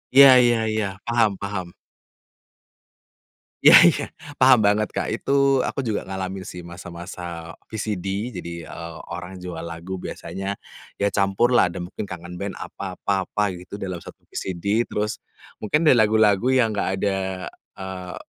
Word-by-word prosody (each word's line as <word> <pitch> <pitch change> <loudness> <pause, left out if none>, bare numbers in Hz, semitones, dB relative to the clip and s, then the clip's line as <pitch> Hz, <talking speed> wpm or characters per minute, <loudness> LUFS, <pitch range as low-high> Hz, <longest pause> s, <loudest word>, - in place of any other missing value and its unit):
Iya 140 0 +11 0.2
iya 120 -1 +4
iya, 110 -1 0 0.2
paham 120 -2 +3
paham. 100 -3 -3 2.0
Iya - - +10
iya - - +1 0.3
paham 130 -3 +6
banget, 105 0 +2
Kak. - - -2
Itu 140 +1 +2
aku - - -3
juga 105 -2 -1
ngalamin 95 0 -5
sih 90 - -8
masa-masa 85 -1 -8 0.2
VCD, 105 -1 -3
jadi, 85 -2 -6
eee, 85 -1 -8
orang 90 +2 -7
jual 90 -2 -6
lagu 85 +3 -6
biasanya 95 +2 -5 0.4
ya 100 - +2
campurlah 100 +1 +3
ada 90 - -6
mungkin 90 +3 -6
Kangen 90 -3 -8
Band, 100 +2 -5
apa 95 -2 -7
apa 95 -1 0
apa 105 +3 -1
gitu 90 +3 -9
dalam 95 -4 -5
1 - - -12
VCD 100 +5 -1
terus, 105 -2 -3 0.4
mungkin 150 +10 +2
dari 130 - +7
lagu-lagu 110 -3 +4
yang 120 -5 +3
nggak 100 - 0
ada, 100 -1 0 0.6
eee, 95 -1 -6
95 Hz, 145 wpm, -23 LUFS, 90-110 Hz, 2.0 s, Iya